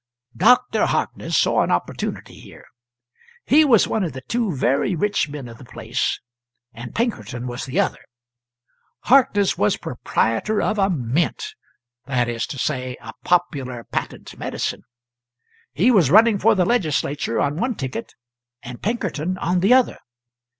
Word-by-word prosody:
"Dr." 240 +2 +3
Harkness - - -1
saw - - +3
an - - 0
opportunity - - -3
here. - - -14 0.8
He 305 +3 +5
was 245 -8 +4
one 220 - -1
of 165 -7 -3
the 130 - -7
two 230 -4 0
very 135 +8 +1
rich 200 -2 0
men 145 -3 -7
of 115 -1 -12
the - - -12
place, 115 -1 -3 0.5
and 120 +1 -9
Pinkerton 225 - -2
was 125 +1 -5
the 130 - -1
other. - - 0 1.0
Harkness 220 -6 +3
was 105 - +2
proprietor 115 - -1
of 215 0 0
a 195 0 +3
mint; 165 - -1 0.5
that 125 -3 0
is 115 -1 -3
to 140 - -7
say, 130 -2 -2
a - - -10
popular 140 -9 0
patent - - -5
medicine. - - -3 0.9
He 215 +11 +3
was 185 - +4
running 215 +3 +5
for 220 +2 +4
the 185 -3 +2
Legislature 150 - 0
on 145 +1 0
one 240 +5 -1
ticket, 130 -6 -6 0.5
and 120 0 -9
Pinkerton 185 -6 -2
on 180 0 0
the 200 +8 +5
other. 260 -1 +2
175 Hz, 150 wpm, -21 LUFS, -, 1.0 s, He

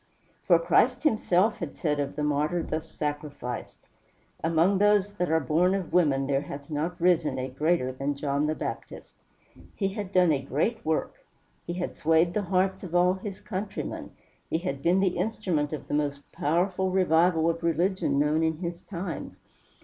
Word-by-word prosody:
For 175 - +7
Christ 225 - +2
himself 215 - +2
had 165 -5 -6
said 150 -3 0
of 140 0 -2
the 150 - -2
martyr 150 +4 0
thus 160 +1 -4
sacrificed: 145 -5 -5 0.7
"Among 165 +4 +3
those 205 -1 +3
that 180 -3 -1
are 160 0 +3
born 165 +7 +2
of 190 -4 -4
women 145 -6 +3
there 135 0 +1
hath 145 +1 -8
not 160 +4 -2
risen 170 -3 +2
a 130 0 -3
greater 140 0 +1
than 135 +2 -2
John 140 +1 0
the 155 - 0
Baptist." - - -6 0.6
He 195 -2 0
had 195 -1 -5
done 180 -3 +4
a 140 -3 +1
great 160 - -1
work; 160 0 -2 0.4
he 170 - -2
had 180 0 -4
swayed 165 +2 +3
the 210 - 0
hearts 190 0 0
of 175 -2 -5
all 180 +1 +4
his 190 0 -7
countrymen; 195 0 -5 0.4
he - - +1
had 150 -6 -4
been 180 +5 +3
the 190 -2 +1
instrument 180 -9 -1
of 150 -3 -6
the - - -4
most 145 -1 -2
powerful 180 +5 0
revival 175 -2 +3
of 165 0 0
religion 170 -1 +1
known 150 +2 +2
in 160 -1 +1
his 170 0 -5
times. 175 -2 -6
170 Hz, 175 wpm, -27 LUFS, 150-185 Hz, 0.7 s, For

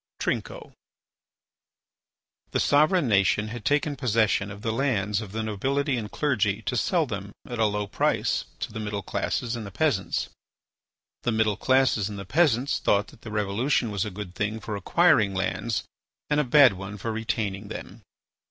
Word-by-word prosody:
TRINCO - - -3 1.8
The - - -1
sovereign 155 +2 +3
Nation 105 0 +2
had 115 -1 -7
taken 145 +2 +1
possession 110 -5 +1
of 105 0 -9
the 115 - 0
lands 110 -5 0
of 105 -3 -8
the 110 +1 -3
nobility 135 +7 0
and 110 -3 -4
clergy 110 -9 0
to - - -2
sell - - +2
them - - -5 0.2
at 120 -2 -5
a 110 - +4
low 105 0 -1
price - - 0 0.2
to - - -4
the 110 - -5
middle 105 -2 -3
classes 120 -1 -2
and 115 - -5
the 100 - -7
peasants. 110 - 0 0.9
The 120 - 0
middle 110 -2 +2
classes 130 -4 +2
and 105 - -6
the 100 - -6
peasants 140 - +2
thought 100 +1 +2
that - - -18
the 110 - -8
revolution 110 +4 0
was 100 -2 -1
a 105 - -3
good 95 -2 -7
thing 105 +4 -2
for 110 -1 -5
acquiring 110 - +3
lands 95 +4 -1 0.5
and 150 - +3
a - - +3
bad 130 -2 +7
one 95 +2 -7
for 115 +3 -3
retaining 110 -3 -2
them. - - -8
110 Hz, 170 wpm, -26 LUFS, 105-130 Hz, 1.8 s, bad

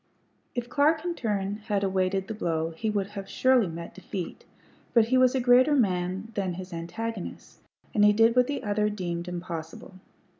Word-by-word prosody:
If 240 -1 -2
Clark 305 +4 +2
in 350 - 0
turn 205 -7 -2
had 205 -3 0
awaited 190 0 0
the 220 - -4
blow 165 -5 -1
he 215 +7 -3
would 200 -2 -1
have 195 -2 -7
surely 255 -5 +3
met 170 0 -7
defeat; 190 0 -6 0.5
but 230 -1 +5
he 255 - +4
was 255 0 +4
a - - +2
greater 255 +4 +5
man 190 -2 0
than 190 -3 -1
his 185 0 -8
antagonist, 185 +5 -6 0.3
and 210 - +3
he 210 - +7
did 225 +2 +4
what 250 0 +4
the 285 - -3
other 210 0 +1
deemed 175 -4 -4
impossible. 170 0 -6
205 Hz, 180 wpm, -27 LUFS, 180-235 Hz, 0.5 s, he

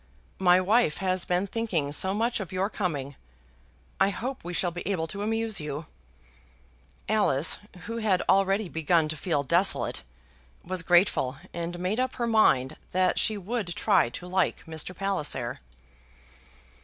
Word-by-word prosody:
"My 180 -1 +5
wife 200 -3 +2
has 185 -1 0
been 180 +2 +1
thinking 190 -9 -2
so 190 +6 +2
much 230 +4 0
of 190 -5 -6
your 190 +3 -1
coming. 145 -8 -3 0.8
I 195 - +4
hope 250 +6 -5
we 175 - -5
shall 175 0 0
be 175 +1 -6
able 175 -5 0
to 200 +5 -5
amuse 225 -1 0
you." 150 +1 -5 1.2
Alice, 170 -8 +3 0.2
who 230 +6 -5
had 210 -5 +1
already 195 +1 +3
begun 160 -1 +1
to 155 - -2
feel 150 -2 -1
desolate, 170 +7 +1 0.6
was 185 0 -2
grateful, 175 -7 +3 0.2
and 170 +1 -4
made 185 +6 -1
up 255 0 0
her 240 - -1
mind 215 - +3 0.2
that 185 0 +2
she 215 - +1
would 200 -2 -3
try 120 - +3
to 175 - -8
like 185 -2 0
Mr. 160 +2 -4
Palliser. 150 -11 -2
185 Hz, 150 wpm, -27 LUFS, 165-205 Hz, 1.2 s, My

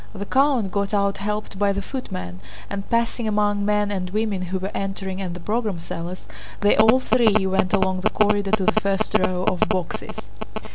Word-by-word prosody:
The 200 - -5
count 260 -5 +2
got 200 +2 -1
out 200 -1 +1
helped 210 -1 -4
by 205 -1 +3
the 200 0 -2
footmen, 90 - -6 0.3
and, 195 -1 -5
passing 235 0 0
among 205 -1 +1
men 210 0 +1
and 185 -2 -3
women 210 -1 -1
who 185 +1 -2
were 190 +2 -4
entering 195 -1 -4
and 180 -2 -4
the - - -7
program 210 +1 -1
sellers, 170 +2 -6 0.4
they 205 - +4
all 220 +4 +6
three 220 -6 +3
went 190 -1 +1
along 190 0 +1
the - - +3
corridor 205 -1 +2
to 210 -1 +2
the 215 0 +3
first 195 -1 -1
row 185 0 0
of 185 -1 +1
boxes. 180 -2 -4
200 Hz, 190 wpm, -23 LUFS, 190-215 Hz, 0.4 s, all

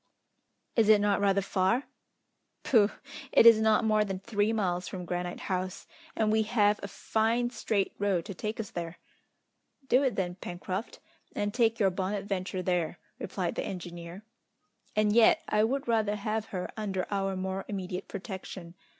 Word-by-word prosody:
"Is 220 -2 +4
it 215 -1 +7
not 205 -1 +2
rather 200 -1 +3
far?" 190 +7 +1 0.8
"Pooh! 215 -5 +4 0.4
it - - +6
is 230 -1 +9
not 220 +1 +4
more 215 -1 +3
than 195 -2 -3
three 205 +1 0
miles 180 -5 -1
from 180 -2 -6
Granite 175 0 -3
House, 185 -1 -3 0.3
and 215 -1 +2
we 220 0 +3
have 210 -1 +2
a - - -4
fine 230 +4 0
straight 205 -5 -1
road 195 -4 +1
to 195 - -6
take 215 +5 -4
us 215 -3 -4
there!" 170 0 -5 0.9
"Do 255 - +4
it 260 -6 +1
then, 180 -2 -2
Pencroft, 185 +4 -5 0.4
and 205 0 -1
take 230 -2 +2
your 195 -3 +3
Bonadventure 190 0 -2
there," 175 -2 0 0.2
replied 185 -2 -3
the - - -3
engineer, 175 +1 -7 0.7
"and 210 -1 +3
yet 235 +8 +5
I 210 0 +2
would 270 +4 -1
rather 220 -3 +2
have 215 +1 -2
her 185 -4 -5
under 195 -4 -2
our 195 -1 0
more 190 +1 -3
immediate 185 -2 -4
protection. 190 -3 -7
200 Hz, 160 wpm, -29 LUFS, 185-220 Hz, 0.9 s, is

